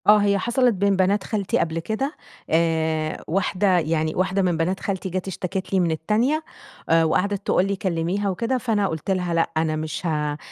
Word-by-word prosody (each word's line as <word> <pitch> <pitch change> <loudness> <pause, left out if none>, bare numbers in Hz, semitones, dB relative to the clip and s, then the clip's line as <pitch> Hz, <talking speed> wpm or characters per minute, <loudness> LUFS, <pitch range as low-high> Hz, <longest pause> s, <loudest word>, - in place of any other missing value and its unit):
آه 210 +1 +8
هي 200 -1 +3
حصَلٍت 240 +4 +2
بين 200 0 +2
بنات 190 +2 +2
خالتي 205 -4 -1
قبل 165 0 -1
كده، 245 - -3 0.3
آآ 160 -1 0
واحدة 185 +1 +2
يعني 160 -1 -1
واحدة 190 +2 +1
من 180 -3 +1
بنات 180 +4 0
خالتي 190 -1 -3
جَت 185 +1 -3
اشتكت 190 0 -4
لي 190 - +4
من 175 -2 +2
التانية، 225 - +1 0.5
آآ 165 0 +5
وقعدِت 195 +5 0
تقول 185 - +3
لي: 200 0 -1
"كلّميها 185 +2 -1
وكده" 230 +7 -1
فأنا 220 -5 0
قُلت 160 +3 -3
لها: 180 -2 0
"لأ 165 0 +1
أنا 160 -1 +1
مش 155 +3 -4
ه 150 -2 -1
185 Hz, 190 wpm, -23 LUFS, 165-200 Hz, 0.5 s, آه